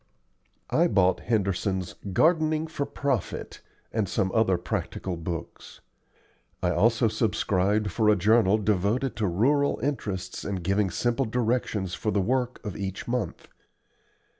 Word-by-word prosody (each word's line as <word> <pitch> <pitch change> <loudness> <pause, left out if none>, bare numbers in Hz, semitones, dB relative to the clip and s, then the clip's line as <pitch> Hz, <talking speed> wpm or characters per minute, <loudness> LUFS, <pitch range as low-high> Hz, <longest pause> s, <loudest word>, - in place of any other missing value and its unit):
I 170 +2 +4
bought 95 - +3
Henderson's 95 -4 -1 0.2
"Gardening 155 - +3
for 150 -3 -4
Profit" 140 -5 -3 0.3
and 110 -5 0
some 95 0 0
other 110 -5 +3
practical 90 +1 -3
books. 85 0 -7 0.8
I 90 - +2
also 115 +5 +3
subscribed 105 -2 +1
for 110 +1 +2
a 105 - +6
journal 105 +1 +4
devoted 110 +5 0
to 110 -2 +1
rural 140 +11 +2
interests 105 -10 -3
and 95 -3 -3
giving 100 +2 +1
simple 120 +8 0
directions 110 -5 -1
for 100 +3 -2
the 105 - +1
work 125 +5 0
of 105 - -4
each 95 -1 -5
month. 120 -2 -3
105 Hz, 130 wpm, -26 LUFS, 95-125 Hz, 0.8 s, a